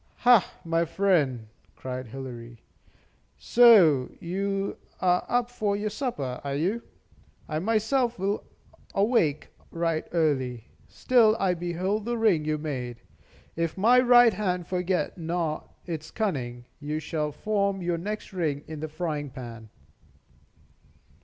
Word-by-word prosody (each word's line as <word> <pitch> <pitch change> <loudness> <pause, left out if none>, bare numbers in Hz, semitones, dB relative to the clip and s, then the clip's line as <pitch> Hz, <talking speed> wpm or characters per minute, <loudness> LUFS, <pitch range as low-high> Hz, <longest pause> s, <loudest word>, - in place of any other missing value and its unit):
"Ha, 245 -5 +6
my 165 0 +1
friend!" 155 - +1 0.3
cried 130 -1 -6
Hilary, 120 -1 -8 0.8
"so 190 - +6
you 195 +2 -2 0.2
are 180 -1 +2
up 245 -1 +1
for 210 -4 -1
your 210 +1 -2
supper, 150 - -3
are 140 -1 -3
you? 190 +11 0 0.7
I 155 -1 -2
myself 225 +5 +1
will 195 +2 -1 0.5
awake 195 - +2 0.2
right 165 -1 -1
early. 130 -8 0 0.2
Still 230 -3 +3
I 190 -2 +2
behold 180 +5 -2
the 240 0 -1
ring 200 -9 +2
you 155 0 0
made. 130 -6 -5 0.5
If 165 +1 -2
my 235 +6 +5
right 245 -2 +6
hand 180 -4 -1
forget 180 +1 -1
not 165 -2 -3
its 160 -3 -5
cunning, 125 - -3
you 150 +1 -3
shall 155 -1 -2
form 200 +3 -1
your 170 -1 -1
next 210 +3 -5
ring 150 -6 -1
in 155 -1 -7
the 155 +1 -5
frying 150 -3 -3
pan." 120 -4 -9
170 Hz, 125 wpm, -27 LUFS, 150-205 Hz, 0.8 s, Ha